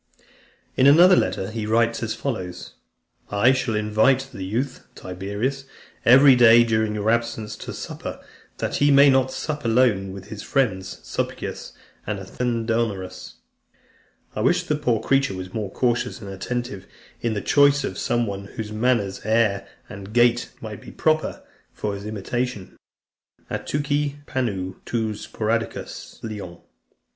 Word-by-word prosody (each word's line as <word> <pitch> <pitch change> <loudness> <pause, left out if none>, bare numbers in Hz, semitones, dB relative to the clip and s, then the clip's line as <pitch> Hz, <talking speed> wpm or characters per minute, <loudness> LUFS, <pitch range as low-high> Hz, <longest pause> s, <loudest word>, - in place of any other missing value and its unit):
In 130 - +5
another 175 +6 +8
letter, 95 - 0
he 110 -1 -4
writes 115 +1 +2
as 110 -1 -2
follows: 95 -10 -5 0.6
"I 105 +5 +4
shall 130 -4 0
invite: 110 +6 +2
the 95 - -6
youth, 125 +8 -3
Tiberius, 100 +9 -4 0.4
every 135 +2 +8
day 120 -1 +7
during 110 -2 0
your 105 +1 +1
absence, 115 -2 -1
to - - -7
supper, - - -6 0.4
that - - -2
he 145 - +4
may 140 0 +7
not 130 0 +3
sup 150 +1 -4
alone 115 -5 +2
with 95 +1 -10
his 105 -2 -7
friends 100 -9 -1
Sulpicius - - -4 0.3
and 105 0 -2
Athenodorus. 115 -1 -2 1.0
I - - -2
wish - - +3
the 150 - 0
poor 120 -7 0
creature 135 -7 +2
was 95 0 -7
more 105 -3 -3
cautious 120 -1 0
and 100 -2 -8
attentive 120 0 -4 0.3
in 115 -2 -1
the - - 0
choice 145 0 +4
of - - -4
some 120 -2 +1
one, 100 -2 -5
whose 105 +1 -7
manners, 110 -3 0
air, 110 -2 +1 0.2
and 100 +1 -9
gait 120 0 +3
might 110 -2 -7
be - - -11
proper 155 0 0 0.3
for 105 -1 -3
his 100 +1 -6
imitation: 110 0 -3 0.8
Atuchei 145 0 -2
panu 130 -4 -1
en 95 -2 -5
tois 110 -3 -3
spoudaiois 115 +1 -3
lian. 105 -6 -6
115 Hz, 145 wpm, -23 LUFS, 100-130 Hz, 1.0 s, another